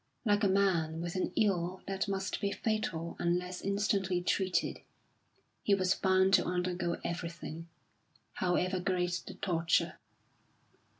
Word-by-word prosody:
Like 205 Hz, 0 st, +3 dB
a -, -, +5 dB
man 180 Hz, -5 st, +2 dB
with 170 Hz, 0 st, -3 dB
an 185 Hz, -, -1 dB
ill 185 Hz, -3 st, +1 dB
that 195 Hz, +1 st, -2 dB
must 195 Hz, 0 st, -2 dB
be 200 Hz, -, 0 dB
fatal 200 Hz, -6 st, -2 dB
unless 180 Hz, +1 st, -1 dB
instantly 195 Hz, -2 st, +1 dB
treated, 185 Hz, +1 st, 0 dB, 0.8 s
he 200 Hz, -, +3 dB
was 185 Hz, -1 st, +2 dB
bound 190 Hz, 0 st, +3 dB
to 185 Hz, -, +6 dB
undergo 180 Hz, -1 st, -1 dB
everything, 170 Hz, -1 st, -5 dB, 0.7 s
however 185 Hz, 0 st, +1 dB
great 180 Hz, -1 st, 0 dB
the -, -, -7 dB
torture. 165 Hz, -3 st, +1 dB
185 Hz, 125 wpm, -32 LUFS, 175-195 Hz, 0.8 s, to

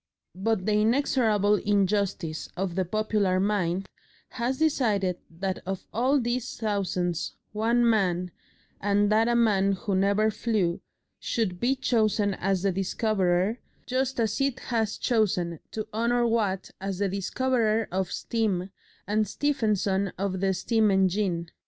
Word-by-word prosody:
But 195 Hz, +1 st, -1 dB
the 215 Hz, -, +1 dB
inexorable 220 Hz, -4 st, +2 dB
injustice 200 Hz, -5 st, 0 dB
of 190 Hz, -1 st, -2 dB
the 185 Hz, +1 st, 0 dB
popular 210 Hz, -1 st, +1 dB
mind 195 Hz, -2 st, 0 dB, 0.4 s
has 255 Hz, +2 st, -2 dB
decided 215 Hz, -, +1 dB
that 185 Hz, +3 st, -3 dB
of 190 Hz, 0 st, -5 dB
all 260 Hz, +6 st, +2 dB
these 245 Hz, 0 st, -2 dB
thousands, 185 Hz, -5 st, -1 dB, 0.2 s
one 235 Hz, +3 st, +2 dB
man, 180 Hz, -5 st, +1 dB, 0.5 s
and 205 Hz, +1 st, +2 dB
that 220 Hz, +2 st, +4 dB
a 240 Hz, -, +2 dB
man 200 Hz, -4 st, +3 dB
who 200 Hz, +1 st, -3 dB
never 200 Hz, +3 st, +2 dB
flew, 205 Hz, -7 st, -1 dB, 0.4 s
should 185 Hz, -6 st, -2 dB
be 255 Hz, +6 st, +2 dB
chosen 215 Hz, -5 st, +1 dB
as 190 Hz, 0 st, -1 dB
the 195 Hz, -, +2 dB
discoverer, 195 Hz, +1 st, 0 dB, 0.3 s
just 260 Hz, 0 st, -1 dB
as 220 Hz, +2 st, 0 dB
it 275 Hz, -2 st, 0 dB
has 220 Hz, -2 st, 0 dB
chosen 180 Hz, -, 0 dB
to 215 Hz, -, -5 dB
honour 235 Hz, +2 st, +1 dB
Watt 210 Hz, -5 st, 0 dB
as 195 Hz, -1 st, -3 dB
the 200 Hz, +1 st, +1 dB
discoverer 220 Hz, +3 st, 0 dB
of 185 Hz, 0 st, -1 dB
steam 200 Hz, -5 st, -1 dB, 0.3 s
and 215 Hz, +1 st, +1 dB
Stephenson 210 Hz, -7 st, 0 dB
of 190 Hz, 0 st, -2 dB
the 190 Hz, 0 st, +1 dB
steam 220 Hz, +3 st, +2 dB
engine. 190 Hz, -3 st, +1 dB
205 Hz, 135 wpm, -27 LUFS, 190-225 Hz, 0.5 s, that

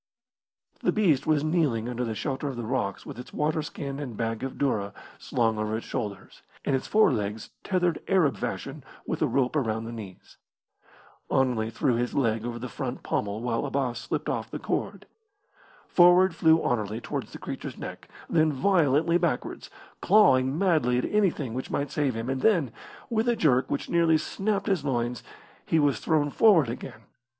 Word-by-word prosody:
The -, -, +2 dB
beast 160 Hz, -11 st, +2 dB
was 155 Hz, -2 st, +3 dB
kneeling 155 Hz, -9 st, +1 dB
under 125 Hz, 0 st, -3 dB
the 115 Hz, -2 st, -3 dB
shelter 135 Hz, +3 st, -3 dB
of 135 Hz, -, -4 dB
the 120 Hz, -1 st, -5 dB
rocks 110 Hz, -5 st, -2 dB
with -, -, -8 dB
its 125 Hz, -, -9 dB
waterskin 150 Hz, -2 st, -2 dB
and 125 Hz, -7 st, -6 dB
bag 115 Hz, -1 st, -2 dB
of 135 Hz, 0 st, -4 dB
doora 105 Hz, -8 st, -1 dB, 0.3 s
slung 115 Hz, -3 st, 0 dB
over 110 Hz, +1 st, -1 dB
its 115 Hz, -, -7 dB
shoulders, 105 Hz, -3 st, -5 dB, 0.2 s
and 135 Hz, -, +2 dB
its 130 Hz, -, -3 dB
forelegs 110 Hz, -, +1 dB
tethered 180 Hz, -3 st, 0 dB
Arab 175 Hz, -8 st, +3 dB
fashion -, -, -5 dB, 0.2 s
with -, -, -3 dB
a -, -, +3 dB
rope 130 Hz, +1 st, 0 dB
around 110 Hz, -6 st, -1 dB
the 115 Hz, -, -6 dB
knees. 105 Hz, -5 st, -10 dB, 0.9 s
Anerley 125 Hz, -4 st, +1 dB
threw 120 Hz, +2 st, 0 dB
his 120 Hz, +1 st, -2 dB
leg 115 Hz, -5 st, +1 dB
over 120 Hz, -1 st, -4 dB
the 125 Hz, +2 st, -5 dB
front 130 Hz, 0 st, -5 dB
pommel 105 Hz, +2 st, -2 dB
while 120 Hz, 0 st, -1 dB
Abbas 135 Hz, -4 st, -1 dB
slipped -, -, -3 dB
off -, -, -2 dB
the -, -, -5 dB
cord. -, -, -3 dB, 0.8 s
Forward 180 Hz, +1 st, +6 dB
flew 160 Hz, 0 st, +4 dB
Anerley 110 Hz, -2 st, -1 dB
towards -, -, -5 dB
the -, -, -8 dB
creature's -, -, -6 dB
neck, -, -, -8 dB, 0.2 s
then 160 Hz, -2 st, +3 dB
violently 165 Hz, +1 st, +3 dB
backwards, 165 Hz, -8 st, -2 dB, 0.3 s
clawing 135 Hz, -9 st, +4 dB
madly 155 Hz, -10 st, +2 dB
at 125 Hz, -, 0 dB
anything 180 Hz, -, 0 dB
which 130 Hz, +2 st, -4 dB
might 140 Hz, 0 st, -2 dB
save 145 Hz, -6 st, 0 dB
him, 115 Hz, +1 st, -4 dB
and 130 Hz, 0 st, -2 dB
then, 170 Hz, -, +3 dB, 0.4 s
with 225 Hz, +1 st, +1 dB
a 240 Hz, -, +3 dB
jerk 130 Hz, -, +2 dB
which 140 Hz, -, -2 dB
nearly 165 Hz, -2 st, +3 dB
snapped 200 Hz, +5 st, -2 dB
his 190 Hz, -8 st, 0 dB
loins, 120 Hz, -4 st, -1 dB, 0.4 s
he 165 Hz, -, +1 dB
was 145 Hz, -3 st, +2 dB
thrown 150 Hz, -2 st, +1 dB
forward 170 Hz, -, +5 dB
again. 115 Hz, -1 st, -7 dB
135 Hz, 175 wpm, -27 LUFS, 120-160 Hz, 0.9 s, Forward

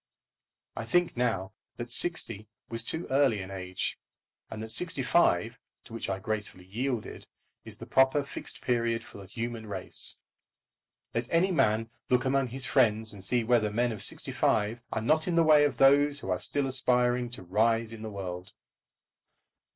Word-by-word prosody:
I -, -, -4 dB
think 175 Hz, -1 st, +1 dB
now 110 Hz, -5 st, -1 dB, 0.2 s
that 120 Hz, 0 st, -6 dB
sixty 115 Hz, -, 0 dB, 0.2 s
was 115 Hz, 0 st, -2 dB
too 160 Hz, +8 st, 0 dB
early 135 Hz, -6 st, +3 dB
an 95 Hz, 0 st, -7 dB
age, 95 Hz, -1 st, -3 dB, 0.5 s
and 110 Hz, 0 st, -6 dB
that 110 Hz, -, -6 dB
sixty 155 Hz, +1 st, 0 dB
five, 125 Hz, -6 st, +2 dB, 0.2 s
to 115 Hz, -, -14 dB
which 115 Hz, -, -4 dB
I 95 Hz, -, -1 dB
gracefully 105 Hz, -2 st, -5 dB
yielded, 120 Hz, +4 st, -4 dB, 0.4 s
is -, -, -10 dB
the -, -, -9 dB
proper 135 Hz, +2 st, +3 dB
Fixed 140 Hz, -, -7 dB
Period 115 Hz, -2 st, 0 dB
for -, -, -12 dB
the 95 Hz, -, -11 dB
human 115 Hz, +1 st, -5 dB
race. 95 Hz, -3 st, -1 dB, 1.0 s
Let 120 Hz, +1 st, -2 dB
any 175 Hz, +3 st, +3 dB
man 115 Hz, -7 st, +1 dB, 0.2 s
look 125 Hz, 0 st, +2 dB
among 135 Hz, 0 st, +2 dB
his 130 Hz, +2 st, -5 dB
friends 110 Hz, -5 st, +2 dB
and 100 Hz, -2 st, -10 dB
see 120 Hz, +4 st, +1 dB
whether 115 Hz, -2 st, +2 dB
men 120 Hz, +3 st, 0 dB
of 105 Hz, -3 st, -6 dB
sixty -, -, -3 dB
five 110 Hz, +3 st, +1 dB
are 110 Hz, -, -2 dB
not 155 Hz, +7 st, +2 dB
in 175 Hz, -, 0 dB
the 165 Hz, -, +5 dB
way 150 Hz, -2 st, +6 dB
of 145 Hz, -, -1 dB
those 145 Hz, +1 st, +5 dB
who 95 Hz, -, -4 dB
are 90 Hz, -, 0 dB
still 145 Hz, -1 st, 0 dB
aspiring 125 Hz, -2 st, +1 dB
to 120 Hz, -5 st, -8 dB
rise 115 Hz, +4 st, +1 dB
in 110 Hz, -, -9 dB
the 110 Hz, -, -5 dB
world. 90 Hz, -3 st, -6 dB
115 Hz, 175 wpm, -29 LUFS, 105-135 Hz, 1.0 s, way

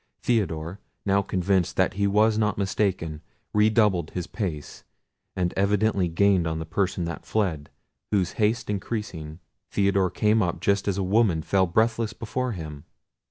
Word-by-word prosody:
Theodore, 95 Hz, -6 st, -1 dB, 0.3 s
now 100 Hz, 0 st, +3 dB
convinced 95 Hz, -2 st, 0 dB
that -, -, +2 dB
he 100 Hz, +1 st, +1 dB
was 105 Hz, +2 st, +3 dB
not 105 Hz, -2 st, +1 dB
mistaken, 95 Hz, -6 st, -1 dB, 0.3 s
redoubled 105 Hz, -5 st, +3 dB
his 90 Hz, -2 st, -4 dB
pace, 90 Hz, -8 st, -5 dB, 0.5 s
and 90 Hz, -2 st, 0 dB
evidently 100 Hz, -1 st, +2 dB
gained 90 Hz, 0 st, +3 dB
on 80 Hz, 0 st, -2 dB
the 80 Hz, -, -4 dB
person 90 Hz, +1 st, -1 dB
that 85 Hz, -, -5 dB
fled, 85 Hz, -9 st, -1 dB, 0.4 s
whose 95 Hz, -4 st, +1 dB
haste 110 Hz, +2 st, +1 dB
increasing, 95 Hz, -6 st, -4 dB, 0.3 s
Theodore 100 Hz, -2 st, +2 dB
came 105 Hz, +4 st, +2 dB
up 85 Hz, -3 st, -1 dB
just 100 Hz, +3 st, +1 dB
as 100 Hz, -2 st, 0 dB
a 100 Hz, -, 0 dB
woman 95 Hz, -4 st, +2 dB
fell 95 Hz, +1 st, +2 dB
breathless 110 Hz, +4 st, +1 dB
before 120 Hz, +3 st, -3 dB
him. 75 Hz, -5 st, -8 dB
100 Hz, 150 wpm, -25 LUFS, 85-105 Hz, 0.5 s, now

